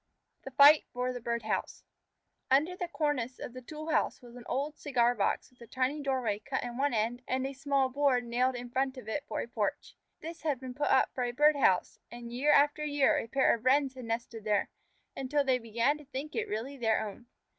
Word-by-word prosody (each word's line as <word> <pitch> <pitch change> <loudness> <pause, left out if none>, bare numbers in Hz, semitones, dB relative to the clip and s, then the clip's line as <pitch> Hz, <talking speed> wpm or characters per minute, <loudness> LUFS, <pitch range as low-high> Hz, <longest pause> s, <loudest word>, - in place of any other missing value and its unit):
THE - - -8
FIGHT 285 +3 +7
FOR 250 +1 -2
THE 245 - -6
BIRD 235 0 -2
HOUSE 215 - -3 0.7
Under 300 +7 +3
the 360 -1 -4
cornice 295 -7 -2
of 245 - -7
the 255 - -8
tool 310 +4 -6
house 310 - +1
was 240 -1 -14
an 245 -1 -11
old 285 +4 -2
cigar 245 -4 +2
box 210 +2 -1
with 250 - -28
a 235 - -11
tiny 260 +5 -1
doorway 255 -7 -1
cut 265 +4 -3
in 240 -1 -5
one 280 +3 +1
end 230 +3 -1
and 260 +1 -1
a 270 - -4
small 275 -1 +1
board 260 -2 +1
nailed 250 +2 +1
in 245 0 -7
front 265 +1 -1
of 250 - -10
it 280 +6 -3
for - - -3
a - - -5
porch. 215 -4 -3 0.2
This 330 +1 -8
had 295 -5 -1
been 255 -1 -7
put 290 +3 -1
up 265 - +3
for 255 - -2
a 245 - -1
bird 295 +4 +4
house, 190 -10 +2
and 235 0 -9
year 280 +5 +2
after 290 +1 +4
year 290 -2 +2
a - - -5
pair 270 +3 +3
of 230 - -4
Wrens 270 +1 +3
had 255 -2 -9
nested 230 -1 -4
there, 210 -1 0 0.4
until 280 +2 0
they 260 -2 +2
began 235 +6 0
to 300 - -14
think 275 +2 -6
it - - -2
really 235 +7 -4
their 225 -3 +1
own. 220 +4 -11
255 Hz, 230 wpm, -30 LUFS, 240-285 Hz, 0.7 s, FIGHT